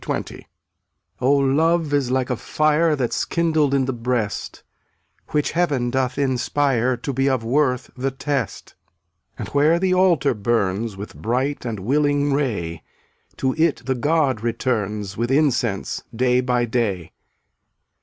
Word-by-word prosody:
0un<j - - -4 0.7
241 130 - +1
Oh, 140 - +5
love 155 +3 +2
is 140 -4 +1
like 130 0 0
a - - +1
fire 155 +6 +1
(ftttt/ll* - - -10
That's 125 -3 -1
kindled 155 -4 +1
in 135 -1 +2
the 130 - -2
breast, 115 -4 -3 0.3
„ - - -44
Which 150 -1 0
Heaven 145 -8 0
doth 130 -1 -1
inspire 130 -1 +1
\j*£' 120 - -26
To 140 - -2
be 135 +2 +1
of 130 -4 0
worth 125 +1 0
the 130 +1 -1
test. 135 -3 -3 0.6
And - - -6
where 150 +4 +3
the 185 +1 +1
altar 180 -7 +3
burns 105 -1 -1
With 100 +2 -8
bright 130 +5 -2
and 110 -5 -4
willing 145 +4 +1
ray, 100 - -2 0.6
To 130 -1 0
it 160 -6 +2
the 135 - +1
god 135 -2 +1
returns 105 -4 -2
With 120 +2 -1
incense 125 -8 +1
day 125 +1 +2
by 125 -1 +1
day. 110 -8 -2
130 Hz, 155 wpm, -22 LUFS, 120-145 Hz, 0.7 s, Oh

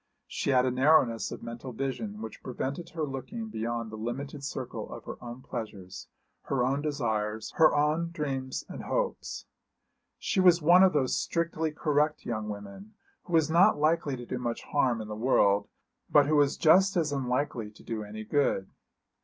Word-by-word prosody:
She - - -3
had 130 -2 +4
a 130 - +1
narrowness 130 -3 +3
of - - -7
mental 115 +2 -7
vision 205 - -4
which - - -8
prevented 140 +7 -4
her 160 -1 -4
looking 220 - -6
beyond 115 - -3
the - - -6
limited 135 +5 -5
circle 130 -2 -5
of - - -8
her - - -8
own 120 +2 -8
pleasures, 100 -5 -7 0.4
her 130 -3 +1
own 135 +3 0
desires, 110 -7 -2
her 160 -1 +6
own 155 +3 +1
dreams 135 -5 -3
and - - -7
hopes. - - -2 0.7
She - - -1
was 180 -2 +6
one 175 +3 +6
of 190 -1 +6
those 135 -4 +1
strictly 165 -2 -1
correct 150 0 0
young 110 -2 -3
women 105 - -9 0.3
who 175 - -8
was 160 -1 +3
not 170 -1 +5
likely 155 -2 +1
to 120 - -8
do 125 - -4
much 120 -2 -3
harm 125 -6 +1
in 110 - -7
the 105 - -5
world 105 -4 +3 0.4
but 145 -1 +6
who 155 +2 +2
was 145 -1 +3
just 190 +4 +5
as 155 -3 +1
unlikely 125 -4 -1
to 105 - -18
do 110 -2 -4
any 105 +1 -7
good. 110 -5 0
135 Hz, 180 wpm, -29 LUFS, 115-155 Hz, 0.7 s, her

